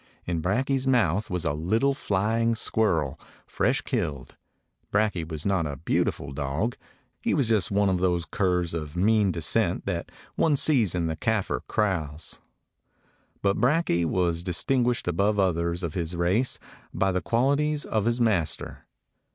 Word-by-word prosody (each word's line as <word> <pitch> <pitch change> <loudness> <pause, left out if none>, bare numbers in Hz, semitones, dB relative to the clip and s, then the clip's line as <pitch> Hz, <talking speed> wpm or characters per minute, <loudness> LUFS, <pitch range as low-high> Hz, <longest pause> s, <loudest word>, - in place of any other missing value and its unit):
In 85 -2 -2
Brakje's 130 - 0
mouth 105 -6 +2
was 90 -2 -2
a 70 - +1
little 110 - +1
flying 115 -1 0
squirrel, 90 -11 0 0.3
fresh - - 0
killed. 70 -4 -3 0.6
Brakje 100 -6 0
was 80 -2 -5
not 95 -5 +1
a 70 - -4
beautiful 70 +1 -1
dog. 75 - -2 0.5
He - - +1
was 140 -6 +1
just 110 -5 +2
one 100 0 +2
of 95 -2 +1
those 90 -2 +1
curs 90 -3 0
of 75 -2 -5
mean 105 +1 +3
de 85 -2 -4
scent - - +1
that - - -3 0.2
one 150 -3 +2
sees 120 - +2
in 85 -2 0
the 80 -1 -1
Kafir 105 - -1
kraals. 80 -7 -2 1.0
But 100 0 +2
Brakje 125 - +2
was 85 -1 0
distinguished 120 +8 0
above 100 +5 +1
others 85 -2 0
of 85 -3 -3
his 85 -1 -3
race 95 +9 +1 0.3
by 95 0 +1
the 90 0 -1
qualities 140 - +1
of 110 -2 -1
his 120 +1 +1
master. 95 -10 -1
95 Hz, 150 wpm, -26 LUFS, 85-115 Hz, 1.0 s, mean